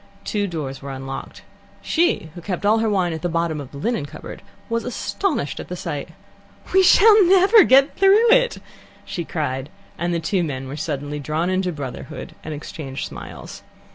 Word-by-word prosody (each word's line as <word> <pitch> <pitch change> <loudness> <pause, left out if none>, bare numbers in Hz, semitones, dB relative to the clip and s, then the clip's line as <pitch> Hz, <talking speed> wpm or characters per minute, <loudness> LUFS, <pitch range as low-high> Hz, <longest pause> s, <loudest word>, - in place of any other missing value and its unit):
Two 205 -1 -1
doors 145 -6 -5
were 140 - -7
unlocked. 135 0 -7 0.4
She, 330 - 0
who 175 - -9
kept 185 +2 -4
all 215 +2 +4
her 225 0 +1
wine 185 -4 +1
at 160 - -5
the 175 - -1
bottom 165 -2 -1
of 135 - -9
the 140 - -11
linen 220 -1 -2
cupboard, - - -10 0.3
was 230 -1 -1
astonished 315 +10 -2
at - - -7
the - - -5
sight. - - -5 0.6
"We 380 - +6
shall 420 +3 +7
never 385 +3 +7
get 275 0 +4
through 410 +5 +5
it!" - - +4 0.5
she 175 - -4
cried, 140 -4 -3 0.3
and 175 +1 -1
the 170 - 0
two 180 +3 0
men 135 -4 -4
were 135 - -6
suddenly 145 -1 -4
drawn 155 +5 -1
into 185 -1 0
brotherhood, 140 -5 -7
and 155 - -6
exchanged 145 -2 -6
smiles. - - -9
170 Hz, 180 wpm, -22 LUFS, 145-245 Hz, 0.6 s, shall